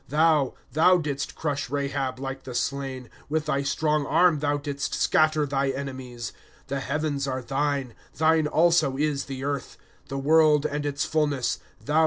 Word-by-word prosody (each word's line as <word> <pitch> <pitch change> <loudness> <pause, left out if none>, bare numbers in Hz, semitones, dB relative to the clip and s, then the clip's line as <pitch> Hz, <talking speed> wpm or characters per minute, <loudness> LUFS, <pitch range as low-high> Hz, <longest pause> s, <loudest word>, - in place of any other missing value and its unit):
^^ - - -26
Thou, 150 -2 +3 0.2
thou 165 +6 +5
didst 145 -4 -3
crush 145 -5 -2
Rahab 140 -2 -2
like 135 0 -5
the 125 -2 -8
slain; 135 -1 -2 0.2
With 155 0 0
thy 140 -2 0
strong 150 +2 +1
arm 170 -2 +4
thou 145 0 +1
didst 140 -1 -3
scatter 155 -1 +3
thy 140 -1 0
enemies. 130 -4 -5 0.2
" - - -29
The 140 0 -1
heavens 140 0 -2
are 130 -1 -3
thine; 135 -1 -1 0.2
thine 160 0 +3
also 160 -4 +3
is 145 -1 0
the 135 -1 -6
earth; 140 -1 -3 0.3
The 135 - -4
world 150 +1 +4
and 145 0 -1
its 145 +1 -1
fullness, 145 -5 0
thou - - -24
didst - - -30
found 110 - -22
them. 150 - +1
140 Hz, 185 wpm, -26 LUFS, 135-155 Hz, 0.3 s, thou